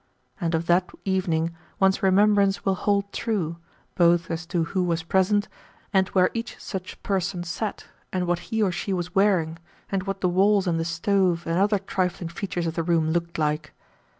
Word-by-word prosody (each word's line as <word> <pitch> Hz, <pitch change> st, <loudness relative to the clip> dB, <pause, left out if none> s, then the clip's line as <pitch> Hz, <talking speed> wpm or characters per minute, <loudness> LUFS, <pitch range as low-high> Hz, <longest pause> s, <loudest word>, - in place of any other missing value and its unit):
And 170 Hz, -3 st, 0 dB
of 160 Hz, +1 st, -1 dB
that 180 Hz, +2 st, +3 dB, 0.2 s
evening 170 Hz, -4 st, 0 dB, 0.2 s
one's 190 Hz, 0 st, +3 dB
remembrance 195 Hz, 0 st, +3 dB
will 195 Hz, -, +3 dB
hold 200 Hz, +1 st, 0 dB
true, 180 Hz, -8 st, -2 dB, 0.4 s
both 170 Hz, -1 st, +3 dB
as 165 Hz, 0 st, -4 dB
to 170 Hz, -1 st, 0 dB
who 185 Hz, +3 st, -1 dB
was 170 Hz, -2 st, 0 dB
present, 190 Hz, +4 st, +2 dB, 0.5 s
and 190 Hz, -1 st, +4 dB
where 185 Hz, -2 st, +3 dB
each 230 Hz, +1 st, -4 dB
such 185 Hz, -2 st, -6 dB
person 185 Hz, -2 st, -1 dB
sat, 200 Hz, +4 st, -4 dB, 0.3 s
and 185 Hz, -1 st, -1 dB
what 175 Hz, 0 st, 0 dB
he 225 Hz, -1 st, +1 dB
or 190 Hz, -, +2 dB
she 195 Hz, +3 st, -3 dB
was 180 Hz, -1 st, -3 dB
wearing, 180 Hz, -5 st, +2 dB, 0.3 s
and 195 Hz, 0 st, -1 dB
what 195 Hz, 0 st, -3 dB
the 185 Hz, -, +3 dB
walls 195 Hz, +2 st, +3 dB
and 170 Hz, -2 st, 0 dB
the 165 Hz, -, -1 dB
stove 170 Hz, +1 st, +1 dB
and 165 Hz, +2 st, 0 dB
other 205 Hz, +1 st, +3 dB
trifling 185 Hz, -3 st, -2 dB
features 175 Hz, 0 st, -3 dB
of 165 Hz, -, -1 dB
the 165 Hz, -, -1 dB
room 165 Hz, -1 st, +1 dB
looked 170 Hz, 0 st, -2 dB
like. 150 Hz, -1 st, -1 dB
180 Hz, 185 wpm, -25 LUFS, 170-195 Hz, 0.5 s, and